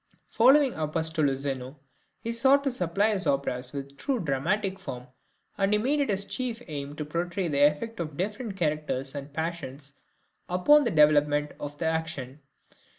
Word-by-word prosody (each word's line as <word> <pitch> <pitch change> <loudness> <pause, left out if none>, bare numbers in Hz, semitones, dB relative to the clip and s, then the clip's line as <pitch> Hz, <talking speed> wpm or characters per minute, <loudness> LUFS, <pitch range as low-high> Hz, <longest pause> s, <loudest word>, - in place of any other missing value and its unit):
Following 265 +3 +5
Apostolo 155 -2 0
Zeno, 135 0 -4 0.4
he 230 - -3
sought 265 +4 +4
to 275 - 0
supply 200 0 +1
his 195 -2 -2
operas 130 -2 0
with 140 -1 -6
a - - -23
true 255 - -2
dramatic 190 +6 -1
form, 125 -9 -7 0.5
and 195 +1 +2
he - - +5
made 275 +7 +1
it 280 - 0
his 200 -1 +2
chief 245 0 -3
aim 145 -2 -6
to 150 - -4
portray 170 +4 -2
the 145 -3 0
effect 175 +10 -4
of 155 -4 -5
different 210 +2 -3
characters 150 -5 -1
and 140 0 -7
passions 150 -3 -5 0.6
upon 270 +12 +5
the - - +2
development 150 -3 +3
of 145 0 -6
the 165 - -3
action. 160 -4 -3
160 Hz, 165 wpm, -27 LUFS, 145-205 Hz, 0.6 s, Following